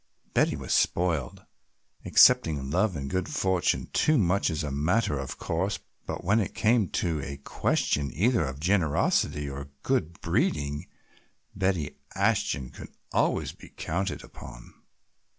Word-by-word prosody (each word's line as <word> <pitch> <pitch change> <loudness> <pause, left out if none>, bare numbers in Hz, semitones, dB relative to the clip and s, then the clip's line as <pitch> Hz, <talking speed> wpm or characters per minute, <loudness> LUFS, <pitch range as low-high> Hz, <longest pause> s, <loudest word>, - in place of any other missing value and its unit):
Betty - - +3
was - - -3
spoiled, 85 -7 0 0.6
accepting 70 -4 +5
love 105 +2 +1
and 70 -2 -4
good 95 +6 -2
fortune 95 -2 +1
too 155 -1 +3
much 100 -2 +2
as 80 -1 -2
a 75 - -3
matter 75 +3 +1
of 65 - -5
course, 95 +5 -1 0.3
but - - -4
when 100 +5 +3
it 100 -3 -2
came 110 -2 +3
to 80 -4 -1
a 70 0 -6
question 70 0 0
either 110 +1 +2
of 65 -1 -5
generosity 80 -4 +1
or 70 0 -6
good 85 +1 -1
breeding 75 -1 -1 0.7
Betty 95 -6 -1 0.2
Ashton 65 -2 0
could - - -10 0.2
always - - +1
be - - -15
counted 95 +4 -3
upon. - - -12
80 Hz, 135 wpm, -27 LUFS, 70-95 Hz, 0.7 s, accepting